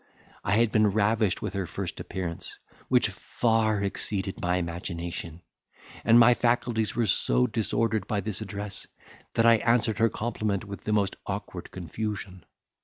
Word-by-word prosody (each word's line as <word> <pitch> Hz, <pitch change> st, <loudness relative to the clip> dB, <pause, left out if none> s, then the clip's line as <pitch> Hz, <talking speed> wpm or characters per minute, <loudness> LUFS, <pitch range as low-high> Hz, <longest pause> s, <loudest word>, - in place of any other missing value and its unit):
I 100 Hz, -, +1 dB
had 115 Hz, +1 st, +3 dB
been 110 Hz, -1 st, +4 dB
ravished 105 Hz, -1 st, +2 dB
with -, -, -3 dB
her 95 Hz, -3 st, -2 dB
first 90 Hz, +1 st, -5 dB
appearance, 85 Hz, -3 st, -5 dB, 0.3 s
which -, -, +3 dB
far 110 Hz, -3 st, +1 dB
exceeded 100 Hz, -1 st, -3 dB
my 90 Hz, +1 st, +1 dB
imagination, 85 Hz, -1 st, -4 dB, 0.6 s
and 115 Hz, 0 st, +6 dB
my 120 Hz, +1 st, +8 dB
faculties 120 Hz, -2 st, +1 dB
were 120 Hz, -, +2 dB
so 60 Hz, -, +2 dB
disordered 110 Hz, -2 st, 0 dB
by 105 Hz, -2 st, 0 dB
this 110 Hz, -1 st, -3 dB
address, 105 Hz, -1 st, -5 dB, 0.5 s
that 115 Hz, -, +3 dB
I 115 Hz, 0 st, +7 dB
answered 115 Hz, -1 st, +2 dB
her 115 Hz, 0 st, +4 dB
compliment 110 Hz, -3 st, -2 dB
with 100 Hz, -1 st, -8 dB
the 110 Hz, -, -1 dB
most 100 Hz, -3 st, +1 dB
awkward 100 Hz, -3 st, -5 dB
confusion. 95 Hz, 0 st, -5 dB
105 Hz, 150 wpm, -27 LUFS, 95-110 Hz, 0.6 s, my